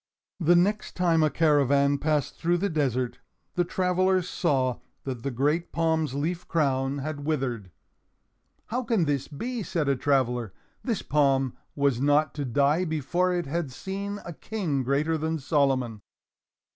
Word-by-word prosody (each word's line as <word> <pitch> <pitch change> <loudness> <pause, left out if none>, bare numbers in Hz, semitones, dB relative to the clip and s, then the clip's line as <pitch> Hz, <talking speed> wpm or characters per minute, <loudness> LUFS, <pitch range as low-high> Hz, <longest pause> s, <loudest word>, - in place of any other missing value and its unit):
The 175 0 +4
next 205 +5 +1
time 170 -3 +3
a 155 - +4
caravan 140 -2 +3
passed 150 -2 0
through 175 +1 +1
the 195 +2 -1
desert, 130 -5 -1 0.3
the 175 - +2
travelers 185 0 +1
saw 130 -9 0 0.2
that 130 -4 -4
the 140 - -2
great 145 +7 0
palm's 160 -4 0
leaf 165 +5 -2
crown 135 -3 +1
had 145 +1 -4
withered. 130 -10 -2 1.0
"How 245 +3 -1
can 225 -8 +1
this 145 -3 -1
be?" 235 - -4
said 165 -6 -1
a 140 - +3
traveler. 125 -6 0 0.3
"This 230 -6 -1
palm 135 -3 +2 0.2
was 140 -4 +1
not 145 +2 +3
to 145 -2 -3
die 140 +7 +2
before 175 +3 0
it 175 -2 -1
had 150 0 -2
seen 200 +7 -5
a 170 - -6
King 170 -7 -2
greater 145 +5 0
than 160 +1 -1
Solomon." 135 -7 +1
150 Hz, 150 wpm, -27 LUFS, 135-175 Hz, 1.0 s, The